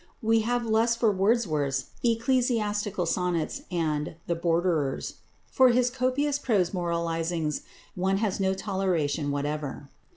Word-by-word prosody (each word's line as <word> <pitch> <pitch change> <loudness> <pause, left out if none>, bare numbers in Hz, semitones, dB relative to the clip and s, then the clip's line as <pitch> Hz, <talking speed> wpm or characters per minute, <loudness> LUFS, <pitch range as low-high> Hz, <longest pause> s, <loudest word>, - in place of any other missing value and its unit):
We 225 +1 +4
have 240 +2 0
less 225 +1 +2
for 230 -2 +3
Wordsworth's 185 - 0
"Ecclesiastical 230 -5 +1
Sonnets" 180 - -1
and 155 -3 -1
"The 170 - 0
Borderers." 165 -4 0 0.3
For 260 -1 +6
his 245 0 +3
copious 265 +3 0
prose 200 -10 +1
moralizings 170 -3 -1 0.3
one 190 +2 0
has 205 -2 -1
no 190 0 +1
toleration 180 -7 -1
whatever. 145 0 -3
190 Hz, 120 wpm, -27 LUFS, 165-230 Hz, 0.3 s, For